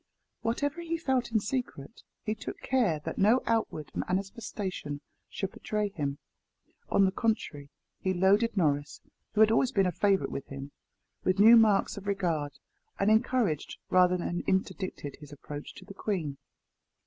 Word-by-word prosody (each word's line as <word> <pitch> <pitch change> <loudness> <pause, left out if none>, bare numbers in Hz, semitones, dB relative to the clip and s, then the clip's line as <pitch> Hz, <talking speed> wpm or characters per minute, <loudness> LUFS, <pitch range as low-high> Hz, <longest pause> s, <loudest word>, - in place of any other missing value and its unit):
Whatever 285 +8 -1
he 335 0 -2
felt 260 -7 0
in 220 - +3
secret, 225 - -4 0.2
he 215 - -1
took 215 - -7
care 235 -12 +1
that - - -4
no 220 +6 +4
outward 220 -10 -1
manifestation 190 - -3 0.3
should 195 -1 -4
betray 210 -1 -2
him. 145 -7 -3 0.7
On 200 - +4
the 190 - +2
contrary 190 - -2 0.3
he 185 - 0
loaded 200 +5 +3
Norris, 145 -4 +1 0.4
who 215 - +4
had 220 0 +7
always 245 +3 +3
been 195 -6 +3
a 180 - +1
favourite 195 +1 +1
with 135 - -5
him, 140 +1 -7 0.5
with 185 +1 +2
new 220 +4 +9
marks 215 -4 +4
of 200 0 -8
regard, 170 -8 -1 0.4
and 195 +2 +3
encouraged 220 - +1
rather 180 0 +5
than 175 0 -2
interdicted 190 -6 -2
his 150 -1 -12
approach 145 +1 -8
to 190 - -12
the 200 - -10
queen. 175 -9 -3
195 Hz, 155 wpm, -29 LUFS, 160-225 Hz, 0.7 s, new